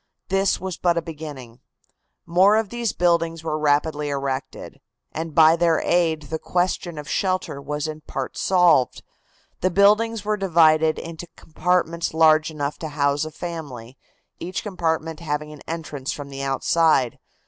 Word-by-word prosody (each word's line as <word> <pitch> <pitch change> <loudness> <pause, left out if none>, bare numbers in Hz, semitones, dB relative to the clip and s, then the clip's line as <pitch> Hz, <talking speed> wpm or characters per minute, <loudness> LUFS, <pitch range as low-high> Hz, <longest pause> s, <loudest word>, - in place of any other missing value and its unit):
This 195 0 +1
was 185 -2 -5
but 175 -1 +1
a - - +1
beginning. 145 -7 -9 0.7
More 185 +5 +4
of 220 -2 -1
these 235 -3 -2
buildings 165 -2 +1
were 155 -1 -2
rapidly 150 0 +1
erected, 135 -1 -4 0.3
and 160 -1 -5
by 160 0 +7
their 170 -1 +2
aid 165 -3 +1
the 160 +2 -5
question 175 -1 -1
of 150 -1 -7
shelter 185 -7 -1
was 150 +2 -3
in 155 0 -7
part 135 -3 -5
solved. 175 -9 +3 0.6
The 185 - +1
buildings 210 +3 +3
were 210 0 0
divided 160 -4 +3
into 165 +1 -7
compartments 170 0 -1
large 155 -1 +5
enough 145 -2 -4
to 160 - -4
house 145 0 0
a 155 - -7
family, 140 -9 -7 0.4
each 180 +2 -4
compartment 165 -5 -2
having 150 -2 -4
an 150 - -13
entrance 150 -5 -5
from 145 -1 -7
the 135 0 -7
outside. 135 -1 +2
160 Hz, 150 wpm, -23 LUFS, 150-175 Hz, 0.7 s, by